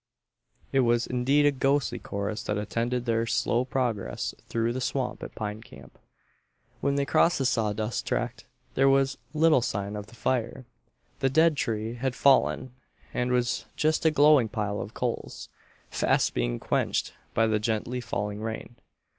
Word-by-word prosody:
It 135 - +2
was 120 -1 +3
indeed 135 +4 +2
a 145 - +5
ghostly 135 -1 +1
chorus 100 +2 -4
that 105 - -1
attended 120 +4 -2
their 115 -1 +1
slow 120 +1 +1
progress 125 -6 -2 0.2
through 115 0 0
the 130 - -3
swamp 125 -1 -2
at - - -8
Pine 105 0 -4
Camp. 70 - -15 0.8
When 140 - 0
they 140 0 +1
crossed 160 +3 +3
the 135 - -1
sawdust 110 -2 -1
tract - - -2 0.3
there 135 +1 +4
was 135 0 +2 0.2
little 155 -3 +5
sign 100 -3 -3
of 105 0 -6
the 105 - -16
fire. 125 +1 -2 0.5
The 135 -1 +2
dead 160 +3 +4
tree 110 -3 -2
had 125 +1 -2
fallen 130 -2 +3 0.4
and 125 0 0
was 125 -1 0
just 155 +1 +1
a 160 - +5
glowing 145 -5 +5
pile 105 -2 -2
of 110 - -8
coals, 120 -2 -4 0.4
fast - - +2
being - - -1
quenched - - -1 0.2
by 115 - +4
the 110 -1 +1
gently 115 +3 -2
falling 105 -2 -3
rain. 110 +1 -6
120 Hz, 160 wpm, -27 LUFS, 110-135 Hz, 0.8 s, a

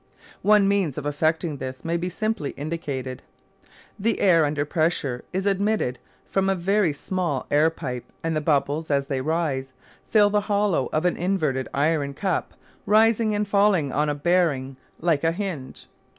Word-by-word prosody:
One 210 -1 +5
means 195 -8 +1
of 150 - -4
effecting 155 +1 0
this 130 +1 -7
may 165 +1 0
be 175 +1 -2
simply 215 -5 -2
indicated. 140 -4 -4 0.8
The 225 +3 0
air 170 -5 +5
under 145 0 -1
pressure 150 -5 -1
is 190 +1 -2
admitted 200 - 0 0.3
from 195 0 +1
a 195 - +2
very 190 0 +2
small 155 -2 -2
air 150 +2 +4
pipe 130 -7 -6 0.2
and 165 -1 -1
the 155 - 0
bubbles, 150 +1 0
as 140 -1 +1
they 135 -2 -2
rise, 140 -4 -1 0.4
fill 205 -2 +5
the 210 0 +2
hollow 200 -9 +1
of 155 +3 0
an 180 - +1
inverted 155 -8 0
iron 145 -1 0
cup 190 +2 -2 0.3
rising 220 0 +4
and 205 0 -1
falling 200 -8 +3
on 150 +3 +1
a 145 - -1
bearing 145 -4 +1 0.2
like 160 -3 +1
a 165 - +3
hinge. 170 -7 -5
165 Hz, 165 wpm, -24 LUFS, 145-195 Hz, 0.8 s, One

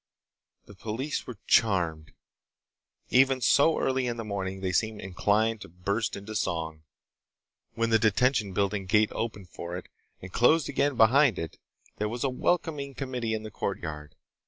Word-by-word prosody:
The - - -13
police 115 +9 -4
were 125 - -7
charmed. 85 -7 +2 1.0
Even 130 +1 +4
so 140 +6 +4
early 130 -1 0
in 120 -1 -2
the 115 - -4
morning 95 -2 -4
they 95 -1 -1
seemed 110 +4 0
inclined 105 +4 0
to - - -9
burst 100 +6 -2
into 100 +2 -8
song. 80 -6 -2 0.9
When 115 0 0
the 110 - +5
Detention 110 0 +2
Building 100 0 -1
gate 105 +2 +3
opened 105 -5 -4
for 85 0 -6
it, 90 - -10 0.3
and 95 0 -10
closed 155 +6 +4
again 140 -1 0
behind 125 +1 +5
it, 80 - -6 0.4
there 105 0 -1
was 120 +2 -4
a 135 - +1
welcoming 140 -1 -1
committee 125 -4 -2
in 110 - -5
the 110 - -8
courtyard. 80 -7 -5
110 Hz, 160 wpm, -28 LUFS, 95-125 Hz, 1.0 s, the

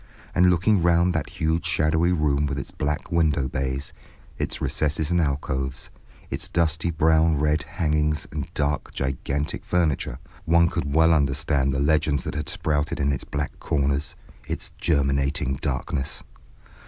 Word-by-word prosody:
And 90 0 +5
looking 90 +3 +3
round 85 +1 +3
that - - -2
huge 80 +1 -1
shadowy 80 +1 +2
room 75 -4 +1
with 70 - -3
its 70 - -5
black 75 +4 -3
window 75 -5 +2
bays, 65 +1 -3 0.5
its - - -2
recesses 75 +1 0
and 85 0 +3
alcoves, 65 -2 -2 0.4
its - - -3
dusty 85 0 +1
brown 80 -1 +3
red 75 +2 +2
hangings 75 -3 -1
and 70 -2 -5
dark 70 0 -1
gigantic 70 +2 -2
furniture, 80 -8 0 0.3
one 85 0 +4
could 80 -5 -2
well 80 +1 +6
understand 70 -1 +1
the 65 - -1
legends 75 -1 +2
that - - -4
had 75 0 -3
sprouted 75 0 -1
in 70 0 +2
its - - -4
black 75 0 -4
corners, 70 0 0 0.3
its - - -5
germinating 70 -3 +1
darknesses. 65 0 -2
75 Hz, 145 wpm, -24 LUFS, 70-80 Hz, 0.5 s, well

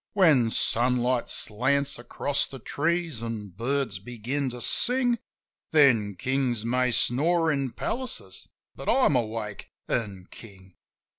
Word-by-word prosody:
When 155 - +4
sunlight 125 +2 +1
slants 135 +5 +1
across 140 +4 -1
the 135 - -9
trees, 160 0 -2
an' 115 -3 -5
birds 115 +2 -2
begin 120 +6 -3
to 125 0 -8
sing. 245 - +2 0.5
Then 115 -10 +4
kings 125 0 -1
may 125 +1 +1
snore 160 +8 +2
in 140 -4 -2
palaces, 220 - -5 0.3
but 135 - -5
I'm 250 - +4
awake 110 -4 -3
— - - -56
and 100 -6 -3
king. 95 -4 -14
125 Hz, 125 wpm, -26 LUFS, 115-145 Hz, 0.5 s, When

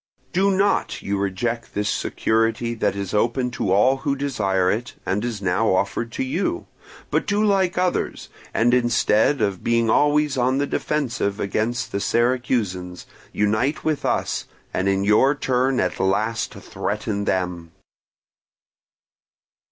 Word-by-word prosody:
Do 190 +2 +3
not 195 +1 +1
you 100 0 -1
reject 115 +5 -2
this 105 0 0
security 115 +2 0
that 115 - 0
is 100 -2 -4
open 120 +4 +1
to 100 -5 -2
all 115 +8 +4
who 140 +1 -1
desire 100 -10 0
it, 120 +3 -3
and 100 +3 -1
is 115 -4 -4
now 95 +2 +2
offered 110 +5 -1
to - - -2
you; 195 - -2 0.5
but - - 0
do 210 +1 +2
like 190 -3 +2
others, 180 0 -1 0.2
and 120 +2 +2
instead 120 +1 +3
of 100 -3 -1
being 115 -1 +2
always 150 -1 +2
on 130 +2 +2
the 140 - +1
defensive 130 -9 -2
against 110 +5 -1
the 100 - -1
Syracusans, 115 -7 0 0.3
unite 110 +8 0
with 155 -3 -1
us, - - -1 0.3
and 95 - +1
in 95 0 +1
your 110 +8 +4
turn 130 -1 +1
at 90 - -1
last 110 +4 0
threaten 105 -1 -3
them." 90 -3 -2
115 Hz, 140 wpm, -22 LUFS, 100-135 Hz, 0.5 s, all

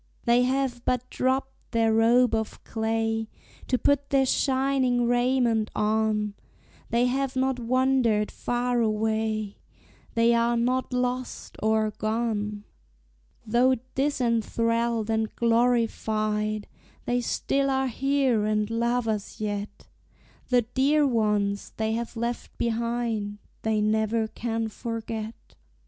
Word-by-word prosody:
They 240 0 +4
have 255 -1 0
but 250 0 0
dropped 265 +1 -2
their 225 -1 +3
robe 235 +2 +4
of 220 -1 -2
clay 225 0 -1 0.4
To 255 - +2
put 280 +3 +1
their 270 -1 +3
shining 260 -2 +1
raiment 245 -2 +2
on; 210 -1 +1 0.6
They 235 +1 +2
have 265 +1 -1
not 260 -1 0
wandered 245 -3 +2
far 245 0 -1
away 220 -1 -1 0.6
They 230 +1 +4
are 235 0 +2
not 255 +3 0
"lost" 250 0 -3
or 220 0 +2
"gone." 215 -1 -2 0.8
Though 245 +4 +3 0.2
disenthralled 230 -4 0
and 220 -1 -1
glorified, 220 -3 +1 0.4
They 245 0 +1
still 275 +3 0
are 265 0 +1
here 265 -3 +1
and 215 0 0
love 235 +1 0
us 210 -2 -3
yet; 205 -1 -4 0.6
The 245 -1 +4
dear 275 +6 +2
ones 210 -5 0
they 220 0 0
have 230 +1 -4
left 235 +1 -4
behind 230 -3 -1 0.2
They 220 -1 +1
never 220 +1 +1
can 225 0 -3
forget. 225 -1 -5
230 Hz, 115 wpm, -26 LUFS, 220-250 Hz, 0.8 s, They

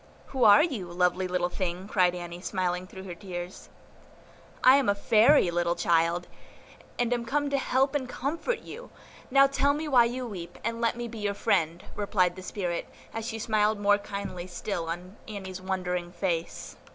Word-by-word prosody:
"Who 260 -3 +1
are 215 +8 +8
you, 250 - -2
lovely 180 +1 +1
little 180 -1 0
thing?" 180 0 -3
cried 180 -3 +2
Annie, 175 0 -7
smiling 180 -1 -2
through 190 0 -10
her 185 -2 -6
tears. 175 -1 -7 0.9
"I 260 +2 +8
am 275 -6 +2
a 200 - +3
Fairy, 215 0 +5
little 170 0 +1
child, 170 0 +2 0.7
and 245 0 +1
am 240 -1 -1
come 285 +4 -1
to 280 - +2
help 265 +1 +1
and 265 -4 -2
comfort 315 - -2
you; 485 +2 -10 0.4
now 275 +1 +6
tell 275 +1 +2
me 305 +2 -3
why 250 -5 +6
you 250 +2 -3
weep, 175 -6 -7
and 230 +1 -2
let 235 0 +1
me 240 0 -4
be 225 -1 -8
your 205 -1 -1
friend," 175 -5 0
replied 185 -4 +1
the 185 - -8
spirit, 180 -2 -3 0.2
as 225 0 -4
she 225 - -4
smiled 215 -1 +1
more 205 0 +4
kindly 200 -3 -6
still 175 -1 -4
on 180 +4 -6
Annie's 190 -3 -7
wondering 180 -2 -2
face. 175 -2 -3
200 Hz, 180 wpm, -28 LUFS, 180-235 Hz, 0.9 s, are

